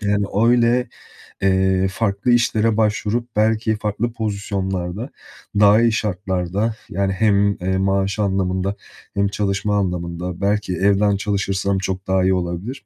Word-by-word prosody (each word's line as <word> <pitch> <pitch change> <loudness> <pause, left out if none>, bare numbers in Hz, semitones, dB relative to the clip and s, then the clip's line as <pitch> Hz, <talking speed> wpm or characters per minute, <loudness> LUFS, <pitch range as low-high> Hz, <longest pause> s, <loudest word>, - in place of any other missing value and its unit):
Yani, 100 -1 +1 0.2
öyle, 120 +1 +3 0.5
eee, 95 0 +2
farklı 100 +3 -1
işlere 115 -2 +2
başvurup 110 +2 -1
belki 110 +1 +2
farklı 110 +2 -2
pozisyonlarda, 100 -1 -3 0.5
daha 105 +2 +6
iyi 115 - +4
şartlarda, 100 0 -1
yani, 95 +1 -1
hem, 100 0 +2
eee, 95 +1 -1
maaş 95 +1 0
anlamında 95 -1 0 0.4
hem 100 0 +1
çalışma 100 0 -1
anlamında, 90 -2 -3
belki 100 -1 0
evden 100 +2 +2
çalışırsam 100 -1 -1
çok 95 0 -4
daha 95 0 +2
iyi 95 +1 +3
olabilir. 95 +7 -4
100 Hz, 125 wpm, -20 LUFS, 95-105 Hz, 0.5 s, daha